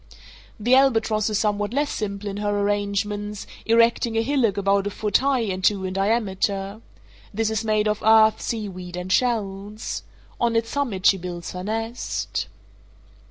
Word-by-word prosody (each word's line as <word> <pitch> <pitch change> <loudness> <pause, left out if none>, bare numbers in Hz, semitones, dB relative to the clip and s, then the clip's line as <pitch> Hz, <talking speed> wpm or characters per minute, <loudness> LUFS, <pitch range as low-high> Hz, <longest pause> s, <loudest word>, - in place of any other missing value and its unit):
The 240 +4 +2
albatross 225 -5 +3
is 210 - 0
somewhat 210 0 0
less 290 +1 +1
simple 205 -1 -4
in 200 0 -4
her 205 0 -1
arrangements, 205 0 -2 0.2
erecting 230 0 +3
a 225 - +2
hillock 245 -6 +1
about 200 0 +2
a - - 0
foot 205 -1 +1
high 270 -2 +1
and 190 -4 -3
two 195 -1 +2
in 185 - -3
diameter. 200 0 -1 0.5
This 220 +1 -1
is 220 0 -1
made 215 -1 +1
of 210 0 -1
earth, 220 0 +5
seaweed, 185 -5 -5
and 180 +1 -5
shells. 210 -3 -1 0.4
On 235 -1 +1
its 230 0 0
summit 235 -10 -2
she 195 - +6
builds 175 -1 -6
her 180 0 -6
nest. 225 +3 -3
210 Hz, 160 wpm, -23 LUFS, 200-225 Hz, 0.5 s, she